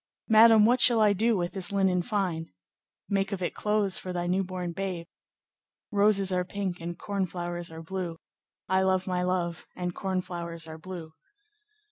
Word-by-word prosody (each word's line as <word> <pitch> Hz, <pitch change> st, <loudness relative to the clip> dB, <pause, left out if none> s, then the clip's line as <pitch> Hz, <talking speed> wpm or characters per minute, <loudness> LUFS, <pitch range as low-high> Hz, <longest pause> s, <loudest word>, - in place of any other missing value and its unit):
'Madame, 220 Hz, -1 st, +7 dB
what 245 Hz, +2 st, +4 dB
shall 235 Hz, -2 st, +6 dB
I 210 Hz, -2 st, +5 dB
do 220 Hz, +2 st, +2 dB
with 175 Hz, -1 st, -1 dB
this 190 Hz, -1 st, -3 dB
linen 190 Hz, -2 st, +2 dB
fine?'—'Make 185 Hz, -, -4 dB
of 190 Hz, -2 st, -3 dB
it -, -, -1 dB
clothes 210 Hz, -2 st, 0 dB
for 185 Hz, -, -6 dB
thy 175 Hz, -1 st, -2 dB
new 185 Hz, +2 st, +1 dB
born 180 Hz, -2 st, -4 dB
babe.' 180 Hz, -1 st, -4 dB, 0.9 s
"Roses 200 Hz, -2 st, +3 dB
are 180 Hz, -1 st, +1 dB
pink 185 Hz, -1 st, -4 dB
and 170 Hz, +1 st, -5 dB
corn 200 Hz, -2 st, -2 dB
flowers 175 Hz, -1 st, -5 dB
are 160 Hz, 0 st, -9 dB
blue, 175 Hz, -1 st, -4 dB, 0.5 s
I 190 Hz, 0 st, +3 dB
love 190 Hz, -1 st, +2 dB
my 180 Hz, -1 st, -1 dB
love, 180 Hz, -2 st, -1 dB
and 180 Hz, -1 st, -3 dB
corn 190 Hz, -1 st, -1 dB
flowers 170 Hz, -2 st, -5 dB
are 160 Hz, 0 st, -9 dB
blue. 170 Hz, -2 st, -8 dB
185 Hz, 170 wpm, -28 LUFS, 175-200 Hz, 0.9 s, Madame